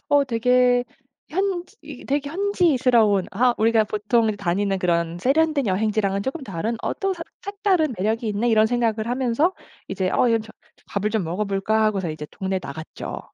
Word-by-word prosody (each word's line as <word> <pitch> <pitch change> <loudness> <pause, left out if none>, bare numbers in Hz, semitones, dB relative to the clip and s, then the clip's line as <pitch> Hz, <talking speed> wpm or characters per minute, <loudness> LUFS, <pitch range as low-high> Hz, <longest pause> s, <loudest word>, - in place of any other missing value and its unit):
어 285 -1 +4
되게 250 0 +3 0.4
현지 370 0 -2
이게 295 -4 -10
되게 285 +1 -1
현지스러운 260 - +2
아 245 +4 +2
우리가 225 0 +3
보통 215 +1 +1
다니는 195 0 -1
그런 170 -1 0
세련된 305 -2 +2
여행지랑은 200 0 0
쪼끔 270 +6 -4
다른 210 +3 -3
어 - - -1
또 390 0 -1
석 335 -2 -7 0.2
색다른 390 - 0
매력이 220 +4 -1
있네?' 210 +4 0
이런 220 -1 +4
생각을 225 -2 0
하면서 255 +7 +1 0.4
'이제 185 -2 -1
어 245 - +3
이제 230 - +3
좀 220 0 -9 0.4
밥을 205 +1 -2
좀 215 -5 0
먹어볼까?' 200 +4 0
하고서 195 -5 0
이제 155 -1 -6
동네에 190 -1 -2
나갔죠. 155 +3 -7
225 Hz, 360 characters per minute, -23 LUFS, 200-270 Hz, 0.4 s, 어